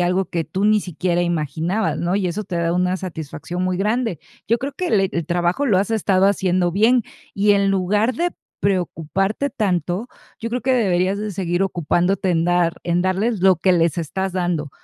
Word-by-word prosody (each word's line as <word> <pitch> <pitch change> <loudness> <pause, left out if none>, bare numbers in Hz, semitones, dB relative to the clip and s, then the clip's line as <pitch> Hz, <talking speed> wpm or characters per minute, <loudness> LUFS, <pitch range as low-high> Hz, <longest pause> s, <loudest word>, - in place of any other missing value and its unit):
algo 180 +2 +1
que 170 -1 -3
tú 190 +5 -2
ni 215 0 +4
siquiera 175 0 -1
imaginabas, 170 +4 -1
¿no?, 175 +3 0
y 195 -3 0
eso 200 +4 -3
te 175 -2 -4
da 170 0 0
una 180 +1 +1
satisfacción 175 0 -6
muy 185 -1 0
grande. 215 - 0 0.3
Yo 230 - +4
creo 275 +2 -4
que 365 -1 -3
le 195 -3 +3
el 170 -2 -2
trabajo 175 +10 0
lo 200 -6 +3
has 200 +3 0
estado 195 -3 +2
haciendo 185 -3 +1
bien. 230 +5 +4 0.3
Y 205 +1 +2
en 200 -1 +3
lugar 205 +5 +1
de 350 +6 0 0.3
preocuparte 195 - -1
tanto, 195 - -1 0.3
yo 230 -2 -4
creo 245 +1 -3
que 260 0 +2
deberías 190 -4 +1
de 210 -1 -4
seguir 180 0 -1
ocupándote 180 +2 0
en 165 -1 +1
dar 175 -1 +2
en 175 +1 0
darles 195 +3 0
lo 190 -2 +5
que 185 +2 +2
les 170 -1 +2
estás 185 +4 -3
dando, 175 -6 -1
185 Hz, 195 wpm, -21 LUFS, 175-205 Hz, 0.3 s, lo